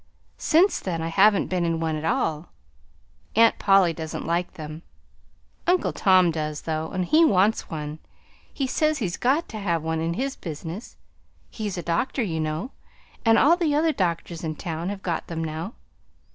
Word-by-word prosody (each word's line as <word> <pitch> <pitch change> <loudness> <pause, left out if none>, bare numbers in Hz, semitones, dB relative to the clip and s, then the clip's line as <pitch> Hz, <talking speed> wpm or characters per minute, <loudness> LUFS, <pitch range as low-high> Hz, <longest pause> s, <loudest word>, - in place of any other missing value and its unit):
Since 345 +5 +3
then 175 -3 -3
I 165 0 -2
haven't 200 +4 +4
been 180 -2 -1
in 165 -1 0
one 160 -1 -1
at 155 - -5
all. 160 0 -1 0.9
Aunt 230 +1 +5
Polly 195 -4 +4
doesn't 160 -1 -5
like 170 +2 -1
them. 155 0 -8 0.9
Uncle 360 0 +2
Tom 185 -3 +4
does, 155 -2 -3
though, 160 0 -2
and 185 -1 -2
he 315 - +5
wants 205 - +3
one. 150 -1 -5 0.5
He 275 - -2
says 310 +4 +1
he's 195 - -2
got 280 +7 +1
to 220 - -6
have 170 -5 -1
one, 160 0 -1
in 165 +1 -1
his 270 +4 -2
business. 165 +6 -7 0.5
He's 210 -4 -4
a 175 - -4
doctor, 235 +9 0
you 165 -6 -2
know, 155 - -3 0.5
and 225 -1 +5
all 325 +4 +6
the 330 -5 0
other 315 +1 +2
doctors 170 - -2
in 155 -1 -3
town 165 +2 -4
have 200 -1 -6
got 170 -3 -2
them 165 -1 -4
now. 160 +7 -5
175 Hz, 175 wpm, -25 LUFS, 160-225 Hz, 0.9 s, all